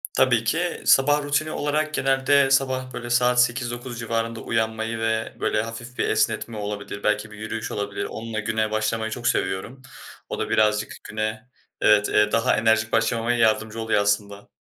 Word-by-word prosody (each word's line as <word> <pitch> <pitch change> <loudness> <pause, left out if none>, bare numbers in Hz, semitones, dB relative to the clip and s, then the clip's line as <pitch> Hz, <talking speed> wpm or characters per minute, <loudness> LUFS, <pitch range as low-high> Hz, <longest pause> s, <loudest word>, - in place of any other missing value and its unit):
Tabii - - +3
ki. - - -1
Sabah 145 +2 +4
rutini 145 +2 0
olarak 155 +1 -1
genelde 135 0 +3
sabah, 130 -1 +1
böyle, 120 0 -6
saat 125 0 +4
08:00-09:00 120 0 -4
civarında 115 0 -2
uyanmayı 110 0 -2
ve, 110 0 -1
böyle, 105 - +1
hafif 120 +2 -8
bir - - +1
esnetme 115 -2 0
olabilir, 100 -1 -5
belki 105 0 0
bir 105 - -11
yürüyüş 110 +1 -5
olabilir, 100 0 -3
onunla 110 0 -5
güne 110 0 -1
başlamayı 110 +1 -1
çok 120 +2 -3
seviyorum. 95 +8 -1 0.5
O - - -4
da - - -2
birazcık 105 0 +2
güne, 110 +2 -4 0.3
evet, 105 -1 +4 0.2
daha 115 +3 +2
enerjik 110 0 +2
başlamama 115 +1 +1
yardımcı 110 -1 +1
oluyor 110 -2 +1
aslında. 100 0 -1
115 Hz, 155 wpm, -24 LUFS, 110-125 Hz, 0.5 s, Sabah